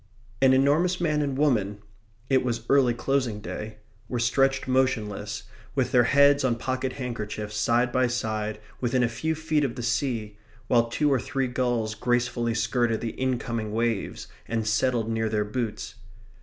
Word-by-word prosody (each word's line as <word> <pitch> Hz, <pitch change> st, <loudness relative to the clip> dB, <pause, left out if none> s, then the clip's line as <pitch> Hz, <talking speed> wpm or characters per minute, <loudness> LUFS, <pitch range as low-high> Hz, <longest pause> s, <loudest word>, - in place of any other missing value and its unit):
An 135 Hz, -1 st, +6 dB
enormous 150 Hz, +7 st, +3 dB
man 155 Hz, -4 st, +1 dB
and 140 Hz, -2 st, -1 dB
woman 110 Hz, -9 st, +1 dB, 0.5 s
(it 130 Hz, -1 st, +3 dB
was 120 Hz, -2 st, -2 dB
early 130 Hz, -4 st, +4 dB
closing 125 Hz, -3 st, 0 dB
day) 110 Hz, 0 st, -6 dB, 0.3 s
were 125 Hz, -, -2 dB
stretched 135 Hz, +3 st, +2 dB
motionless, 130 Hz, -6 st, 0 dB, 0.3 s
with -, -, +1 dB
their 120 Hz, -1 st, +5 dB
heads 140 Hz, +2 st, +5 dB
on 125 Hz, -3 st, +2 dB
pocket 130 Hz, +2 st, -2 dB
handkerchiefs, 110 Hz, -5 st, -5 dB
side 120 Hz, +3 st, +2 dB
by 130 Hz, 0 st, +2 dB
side, 110 Hz, -3 st, -2 dB, 0.2 s
within 125 Hz, 0 st, +1 dB
a -, -, +3 dB
few 125 Hz, +8 st, -2 dB
feet 155 Hz, -1 st, 0 dB
of 130 Hz, -4 st, -1 dB
the 120 Hz, -, -5 dB
sea, 115 Hz, -3 st, -1 dB, 0.3 s
while 115 Hz, 0 st, +3 dB
two 145 Hz, +4 st, +2 dB
or 130 Hz, -, +2 dB
three 135 Hz, +1 st, -2 dB
gulls 120 Hz, -3 st, -1 dB
gracefully 120 Hz, 0 st, 0 dB
skirted 120 Hz, -1 st, +1 dB
the 115 Hz, -, -3 dB
incoming 115 Hz, -4 st, -2 dB
waves, 115 Hz, -2 st, -1 dB, 0.2 s
and 115 Hz, -1 st, -1 dB
settled 115 Hz, +1 st, +1 dB
near 110 Hz, -1 st, 0 dB
their 105 Hz, -1 st, 0 dB
boots. 110 Hz, 0 st, -4 dB
120 Hz, 160 wpm, -26 LUFS, 110-130 Hz, 0.5 s, An